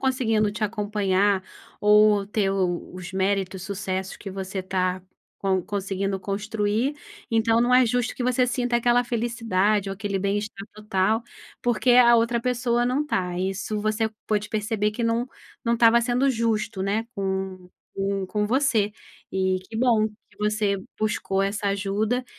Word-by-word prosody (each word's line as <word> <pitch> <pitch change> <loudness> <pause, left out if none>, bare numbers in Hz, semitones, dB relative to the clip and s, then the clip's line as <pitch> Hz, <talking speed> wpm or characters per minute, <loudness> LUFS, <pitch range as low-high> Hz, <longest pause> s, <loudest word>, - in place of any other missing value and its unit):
conseguindo 225 -5 +1
te 215 0 -2
acompanhar 205 -2 +1 0.4
ou 210 -1 +5
ter 205 -1 0
os 180 -1 -3
méritos, 190 -1 -1
sucessos, 190 -1 -4
que 195 - -8
você 190 0 -5
está 185 0 -1 0.4
con 190 -2 +1
conseguindo 195 0 -2
construir, 210 +6 -1 0.3
então 225 0 +3
não 245 +1 +2
é 255 -1 +6
justo 245 0 0
que - - -3
você 250 0 +2
sinta 245 -1 0
aquela 240 +1 +3
felicidade 220 -4 0
ou - - -3
aquele 195 0 -2
bem-estar 200 +1 -2
total, 215 +1 0 0.4
porque 245 +1 +2
a 240 -1 +7
outra 230 +1 +1
pessoa 240 -1 +1
não 275 +4 0
tá, 180 -9 -1
isso 195 +3 -2
você 215 +1 0 0.2
pôde 210 -1 0
perceber 210 0 0
que 235 +2 -2
não 230 +2 0 0.4
não 235 0 +2
estava 230 0 +5
sendo 250 +3 +2
justo, 220 -4 -1
né, 210 +4 -1
com 190 -2 -3 0.3
com 195 0 -1
com 210 +2 -1
você, 230 -4 +2 0.4
e 190 -1 +1
que 225 - -6
bom 225 -3 +3 0.2
que - - -26
você 210 -1 +1 0.2
buscou 210 -2 0
essa 200 +1 -1
ajuda, 205 +5 -1
210 Hz, 150 wpm, -25 LUFS, 195-230 Hz, 0.4 s, a